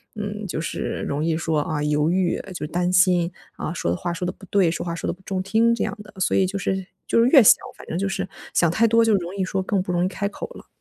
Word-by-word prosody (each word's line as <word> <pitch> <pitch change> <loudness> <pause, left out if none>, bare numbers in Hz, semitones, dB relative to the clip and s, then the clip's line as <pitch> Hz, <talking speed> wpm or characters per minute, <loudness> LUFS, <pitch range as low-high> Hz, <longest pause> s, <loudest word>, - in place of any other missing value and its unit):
嗯， 210 0 -5
就 165 - -3
是 165 - -3
容 145 +2 -1
易 165 -1 +1
说， 160 -1 0
啊， 150 -1 -2
犹 150 +1 +2
豫 180 0 +1
呃， 190 - -8
就 175 - -6
是 - - -5
担 180 +1 0
心， 180 -2 +4 0.3
啊， 155 - -3
说 85 - -1
的 90 - -1
话 175 - -3
说 175 +1 -4
得 180 - -1
不 195 - -15
对， 190 -4 +3
说 165 - -4
话 170 -1 -3
说 - - -4
得 - - 0
不 185 - -18
中 190 -1 -3
听 225 +4 +3
这 235 - -1
样 - - -3
的。 - - -16
所 - - +2
以 190 - +4
就 200 +2 -3
是 190 -1 -2 0.2
就 - - +2
是 235 - +4
越 265 -3 +8
想 - - +9 0.2
反 - - -12
正 165 - -3
就 195 +2 0
是， 195 - -2 0.3
想 170 -2 +3
太 225 +7 +3
多 230 +1 +4
就 225 -1 +3
容 180 0 -3
易 195 - -1
说 190 +1 -1
更 190 +1 0
不 185 - -4
容 175 0 +1
易 - - +2
开 200 +1 -2
口 - - -7
了。 - - -12
185 Hz, 320 characters per minute, -23 LUFS, 170-200 Hz, 0.3 s, 想